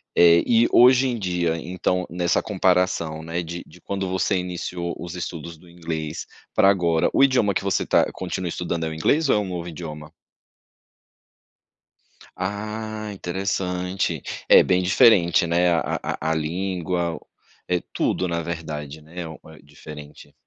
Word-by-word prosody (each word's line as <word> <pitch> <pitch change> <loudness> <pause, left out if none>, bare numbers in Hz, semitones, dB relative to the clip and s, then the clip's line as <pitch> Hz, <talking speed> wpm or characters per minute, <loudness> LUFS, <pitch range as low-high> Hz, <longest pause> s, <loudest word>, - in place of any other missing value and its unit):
Eh, 85 -1 +6
e 115 0 +4
hoje 130 +2 +6
em 120 -2 -1
dia, 90 -4 -1
então, 90 +1 -1
nessa 85 +1 +1
comparação, 90 -5 +1
né, 85 +2 -3
de 85 +1 -6
de - - -18
quando 95 -1 -3
você 95 +1 0
iniciou 90 -1 -4
os 85 +1 -7
estudos 85 -2 -6
do 90 - -19
inglês, 80 -2 -5 0.3
pra 95 - +5
agora, 85 -4 +2
o 135 - +5
idioma 125 -7 +3
que - - -1
você 100 - 0
tá - - +3
continua 95 0 -4
estudando 85 -1 -3
é - - -2
o 80 - -5
inglês, 145 - +2
ou - - +5
é - - +3
um 105 - -3
novo 90 -1 -5
idioma? 75 -2 -8 2.3
Ah, 105 +2 -4
interessante. 90 -2 -2 0.3
É, - - +8
bem 90 0 +2
diferente, 95 -1 +5
né, 85 +1 +2
a 80 - 0
a 80 - -3
a - - +2
língua 85 +1 -2
o - - -16 0.4
é, 90 -1 +1
tudo 90 - 0
na 85 0 -1
verdade, 80 -3 -6
né, 85 +3 -8
o 80 - -9
eh, 80 - -14
diferente. 75 0 -12
90 Hz, 160 wpm, -23 LUFS, 80-95 Hz, 2.3 s, É